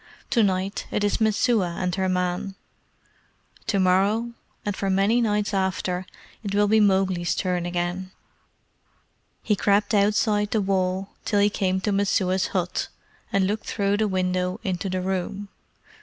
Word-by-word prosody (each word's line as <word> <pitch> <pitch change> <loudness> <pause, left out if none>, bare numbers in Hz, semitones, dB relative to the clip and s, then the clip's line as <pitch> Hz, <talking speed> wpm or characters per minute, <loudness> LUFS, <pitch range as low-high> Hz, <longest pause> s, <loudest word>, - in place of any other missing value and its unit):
To 235 - +4
night 195 -1 0
it 210 - -1
is 205 +2 0
Messua 215 -4 +2
and 180 -1 -1
her 190 0 0
man. 180 +1 -1 1.1
To 200 - +1
morrow, 200 +6 +2 0.3
and 205 -1 -1
for 195 - -2
very 190 - +2
many 210 +5 +3
nights 210 -2 0
after, 185 -1 -1 0.3
it 200 -2 -3
will 205 0 +4
be 220 +1 +4
Mowgli's 190 -4 +2
turn 180 -2 -1
again." 175 +1 -2 1.3
He 210 - +2
crept 205 +2 +2
along 200 -1 +5
outside 210 0 +1
the 220 - +1
wall 190 0 0
till 205 - +1
he 205 +1 +4
came 190 -2 0
to 210 - 0
Messua's 190 -2 +1
hut, 180 -2 -2 0.4
and 195 -1 +2
looked 210 +3 -2
through 200 -1 0
the 215 0 +1
window 185 0 -1
into 190 0 -2
the 185 0 -1
room. 190 +2 -3
195 Hz, 155 wpm, -24 LUFS, 185-205 Hz, 1.3 s, along